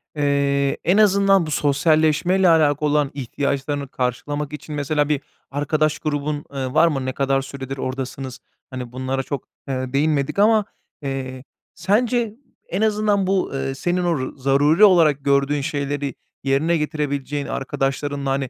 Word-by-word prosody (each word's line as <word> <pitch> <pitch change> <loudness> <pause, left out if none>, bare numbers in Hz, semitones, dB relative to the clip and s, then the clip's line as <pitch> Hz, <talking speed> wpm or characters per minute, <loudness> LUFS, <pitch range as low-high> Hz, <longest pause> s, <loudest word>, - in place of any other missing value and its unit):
eee, 140 -1 +1
en 180 +5 +3
azından 195 -3 +4
bu 155 - -5
sosyalleşmeyle 155 +5 +3
alakalı 150 -2 +3
olan 145 -2 +1
ihtiyaçlarını 140 +1 -2
karşılamak 140 +4 -3
için 150 0 -7
mesela 145 +1 0
bir 145 -2 +1 0.3
arkadaş 155 +2 0
grubun, 145 -1 -2
eee, 130 -1 -3
var 160 +2 +5
mı? 135 -5 -1
Ne 130 - -2
kadar 135 0 +1
süredir 135 0 -7
oradasınız? 130 0 -5 0.3
Hani, 125 -2 -6
bunlara 130 +1 -2
çok, 140 -2 -5 0.2
eee, 130 -1 -3
değinmedik 145 +3 +1
ama, 215 0 +4 0.4
eee, 130 -2 -5 0.3
sence 225 +1 +1 0.3
en 185 +4 -2
azından 210 -2 +2
bu, 190 0 +1
eee, 135 0 -2
senin 175 +5 -1
o 170 -2 +1
ru 130 +2 -5
zaruri 145 +8 +3
olarak 160 -8 +5
gördüğün 140 +1 +2
şeyleri 140 0 -3 0.3
yerine 140 +5 +2
getirebileceğin 145 -2 -2
arkadaşlarınla, 140 0 -2
hani, 135 -2 -1
145 Hz, 145 wpm, -21 LUFS, 135-160 Hz, 0.4 s, var